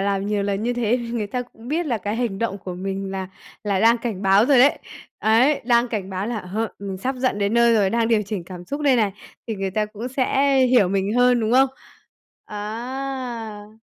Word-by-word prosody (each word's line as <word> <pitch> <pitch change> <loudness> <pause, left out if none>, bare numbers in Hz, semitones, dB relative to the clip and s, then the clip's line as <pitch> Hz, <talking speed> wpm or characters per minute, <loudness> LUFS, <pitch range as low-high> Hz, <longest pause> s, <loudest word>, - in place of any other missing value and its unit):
làm 195 0 0
nhiều 205 -1 0
lần 200 +1 -1
như 245 +1 0
thế 240 -1 +1
thì 235 - -6
người 225 -3 -2
ta 250 +5 -3
cũng 240 0 -14
biết 325 +2 -1
là 235 -5 0
cái 205 +3 -3
hành 235 -6 -2
động 205 -3 -2
của 180 -1 -7
mình 195 +1 -4
là 190 -1 -4 0.4
là 200 -2 0
đang 230 +1 +5
cảnh 220 -5 -4
báo 195 +3 +4
rồi 275 -2 +5
đấy. 270 +4 +5 0.4
Đấy, 255 +7 +3
đang 240 0 +3
cảnh 200 -4 -4
báo 190 +2 -3
là, 235 -1 -2
ờ, 210 +4 -3
mình 195 -1 -5
sắp 260 +6 -2
giận 250 -4 0
đến 200 +2 0
nơi 235 -1 +5
rồi, 200 -3 +3
đang 230 -1 +1
điều 220 -2 +3
chỉnh 200 -3 -5
cảm 180 0 -9
xúc 285 +11 -5
đây 275 -3 +3
này. 210 -4 +1 0.3
Thì 225 - -3
người 195 -1 -3
ta 210 +2 0
cũng 220 +3 -7
sẽ 270 +1 +1
hiểu 245 -7 +4
mình 195 +2 0
hơn, 245 -1 +4
đúng 220 +1 0
không? 265 +1 +5 0.8
À! 225 -1 -6
220 Hz, 230 wpm, -22 LUFS, 200-245 Hz, 0.8 s, đang